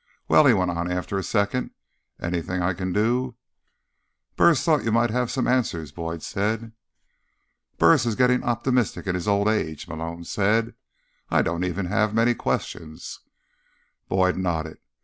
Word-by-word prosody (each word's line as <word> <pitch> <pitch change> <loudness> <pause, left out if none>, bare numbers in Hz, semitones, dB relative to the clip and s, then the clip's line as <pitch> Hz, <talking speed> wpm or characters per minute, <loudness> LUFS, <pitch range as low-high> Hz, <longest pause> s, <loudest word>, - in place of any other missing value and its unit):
"Well," 150 - +6
he 125 - +7
went 90 -2 +1
on 85 +1 -2
after 90 +2 -2
a - - -4
second, 100 +5 0 0.5
"anything 90 +1 -2
I 90 +1 +1
can 90 +1 -3
do—" 120 +5 0 1.0
"Burris 165 -6 +4
thought 155 -3 +2
you 115 - 0
might 115 0 +2
have 125 0 0
some 130 - -1
answers," 85 - 0
Boyd 85 +1 -5
said. 110 +3 -2 1.1
"Burris 135 -7 +5
is 115 - 0
getting 125 +1 +3
optimistic 120 -1 0
in 95 - -1
his 90 +1 -3
old 100 0 +2
age," 80 -8 -1
Malone 85 +1 -6
said. 105 +5 +1 0.6
"I - - +3
don't 85 +1 -1
even 90 +1 -2
have 105 +3 0
many 115 +1 +4
questions." 80 -8 -4 0.9
Boyd 95 -1 +2
nodded. 80 -4 -2
100 Hz, 150 wpm, -24 LUFS, 85-120 Hz, 1.1 s, he